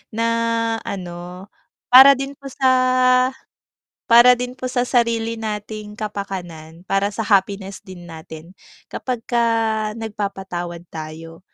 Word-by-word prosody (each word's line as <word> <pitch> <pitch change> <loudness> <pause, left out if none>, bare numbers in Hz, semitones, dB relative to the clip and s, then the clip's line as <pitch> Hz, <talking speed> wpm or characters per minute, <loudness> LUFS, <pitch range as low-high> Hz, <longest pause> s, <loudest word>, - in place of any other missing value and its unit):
na 230 - 0 0.6
ano 180 -1 -7 0.5
para 270 +2 +10
din 275 +1 -5
po 275 - -9
sa 255 -1 +3 0.8
para 240 +2 +7
din 250 0 -4
po 255 0 -6
sa 250 -1 0
sarili 230 -2 0
nating 210 -1 -6
kapakanan, 180 -6 -7
para 195 +1 0
sa 215 +2 -4
happiness 195 -1 0
din 180 -2 -12
natin. 160 +1 -11 0.4
Kapag 245 -3 -4
ka 235 -1 +1 0.5
nagpapatawad 190 -5 -5
tayo, 160 +1 -9
210 Hz, 115 wpm, -20 LUFS, 180-245 Hz, 0.8 s, para